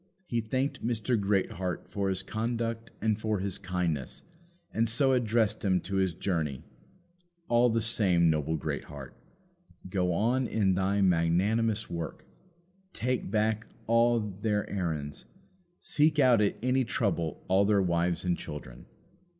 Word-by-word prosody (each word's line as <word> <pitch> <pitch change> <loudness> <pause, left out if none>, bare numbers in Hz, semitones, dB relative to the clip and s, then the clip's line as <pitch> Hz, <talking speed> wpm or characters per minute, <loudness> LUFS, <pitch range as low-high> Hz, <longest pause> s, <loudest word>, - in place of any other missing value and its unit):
He 120 -8 -1
thanked 130 +5 -2
Mr. 120 +1 0
Greatheart 95 -3 -1
for 100 -1 -2
his 95 - -1
conduct 115 0 -3
and 110 0 +1
for 110 -1 0
his 95 0 -3
kindness, 90 -7 -3 0.5
and 115 0 +1
so 135 +3 +3
addressed 115 -3 +1
himself 95 -3 +1
to 100 - -4
his 95 -4 +1
journey. 80 -8 -2 0.8
All 120 +1 +4
the 115 0 +1
same, 95 -7 +3
noble 80 0 +1
Greatheart! 70 -2 -6 0.7
go 90 -1 0
on 120 +8 +1
in 100 -4 +1
thy 95 +2 +1
magnanimous 100 +6 +2
work. 85 -2 -6 0.7
Take 125 -2 -2
back 110 +1 0 0.2
all 115 +1 +4
their 105 +1 -2
errands. 80 -7 -3 0.6
Seek 155 +1 +2
out 125 -6 +5
at 105 - +2
any 130 +1 +2
trouble 95 - -2
all 95 +2 +4
their 100 0 +3
wives 85 0 0
and 90 -1 +2
children. 75 -8 -9
100 Hz, 135 wpm, -29 LUFS, 90-115 Hz, 0.8 s, out